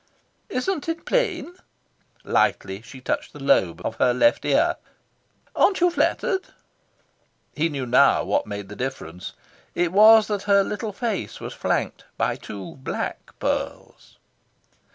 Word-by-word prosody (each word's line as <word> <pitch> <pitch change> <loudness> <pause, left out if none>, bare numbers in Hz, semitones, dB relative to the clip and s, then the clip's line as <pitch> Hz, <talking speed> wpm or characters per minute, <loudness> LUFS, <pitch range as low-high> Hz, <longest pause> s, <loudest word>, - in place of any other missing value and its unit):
"Isn't 330 +1 -2
it 330 0 -4
plain?" 365 - -1 0.7
Lightly 95 +1 0
she 130 +3 -12
touched - - -3
the 145 - -11
lobe 90 -11 +2
of 115 - -3
her 125 -1 +3
left 290 - +3
ear. - - +2 0.8
"Aren't 390 - +3
you 355 0 +4
flattered?" 380 +2 0 1.1
He 160 +2 0
knew 140 -4 -4
now 125 +3 +4
what 100 +2 0
made 100 -1 -6
the 105 - -9
difference. 95 -9 -6 0.4
It 175 -1 +1
was 215 +2 +7
that 205 -2 -2
her 200 0 +6
little 210 +2 -4
face 220 -1 -3
was - - -7
flanked - - -2
by - - 0
two 100 +2 -9
black 130 - -5
pearls. - - -4
170 Hz, 135 wpm, -23 LUFS, -, 1.1 s, was